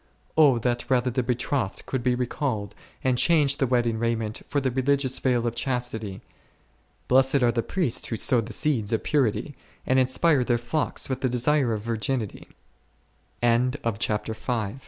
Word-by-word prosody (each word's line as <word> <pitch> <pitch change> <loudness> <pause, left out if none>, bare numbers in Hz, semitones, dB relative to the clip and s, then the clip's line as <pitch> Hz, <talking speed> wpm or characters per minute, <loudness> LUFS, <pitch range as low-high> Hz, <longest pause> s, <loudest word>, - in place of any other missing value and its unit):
O 145 -6 +6
that 120 +1 -2
rather 125 -1 +2
the 130 - 0
betrothed 125 -3 -2
could 130 - -2
be 125 0 +1
recalled, 120 -4 -2 0.3
and 125 -2 +1
change 150 -5 +3
the 135 - +1
wedding 120 -2 +1
raiment 115 -2 -2
for 145 - 0
the 130 -2 -1
religious 130 +1 0
veil 125 -2 +1
of 120 - -1
chastity! 120 -6 -3 0.9
Blessed 135 +1 +4
are 120 - +4
the 115 - 0
priests 165 - -2
who 115 - -3
sow 120 +1 +2
the 115 +1 -8
seeds 115 -4 0
of 115 - 0
purity, 140 0 0 0.3
and 130 +1 +3
inspire 130 +2 +3
their 120 -1 +1
flocks 120 +6 -2
wi 130 -1 -2
125 Hz, 135 wpm, -25 LUFS, 115-135 Hz, 0.9 s, O